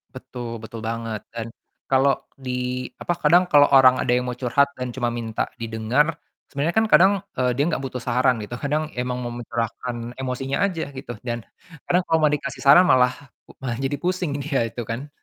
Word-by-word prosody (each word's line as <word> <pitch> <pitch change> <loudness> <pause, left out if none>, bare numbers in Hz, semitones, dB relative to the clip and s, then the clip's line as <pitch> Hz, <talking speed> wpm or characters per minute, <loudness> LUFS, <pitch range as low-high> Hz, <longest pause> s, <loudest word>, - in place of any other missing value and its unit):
Betul 120 -2 -7
betul 110 0 -8
banget 115 -3 -4
dan 115 -1 -4 0.4
kalau 135 +1 +4 0.3
di 125 0 -2 0.2
apa, 175 - 0
kadang 175 +2 +5
kalau 145 -1 +7
ada 140 - +5
orang 130 -1 +7
yang 125 +1 +2
mau 125 - -5
curhat 135 +3 +2
dan 125 -1 -4
cuma 120 -2 -1
minta 115 -2 -3
didengar, 115 +5 +1 0.4
sebenarnya 145 +4 -1
kan 220 - +5
kadang, 190 +3 +7 0.2
eee, 125 -1 +1
dia 145 - +2
gak 160 -5 -1
butuh 130 -2 -5
saran 125 +1 +1
gitu, 105 +3 -7
kadang 150 +2 0
emang 125 0 -2
mencurahkan 120 0 -4
emosinya 130 +1 -2
aja 180 -5 -2
gitu, 120 -3 -7
dan 120 0 -3 0.5
kadang 180 +1 +4
kalau 165 - +2
mau 155 - +5
dikasih 140 -2 -3
saran 145 +7 +7
malah 125 -6 +4 0.5
malah 120 -3 -3
jadi 135 +1 -1
pusing 180 -5 -1
dia 140 -1 -1
itu 120 - -6
kan. 125 +7 -5
125 Hz, 180 wpm, -23 LUFS, 120-145 Hz, 0.5 s, kalau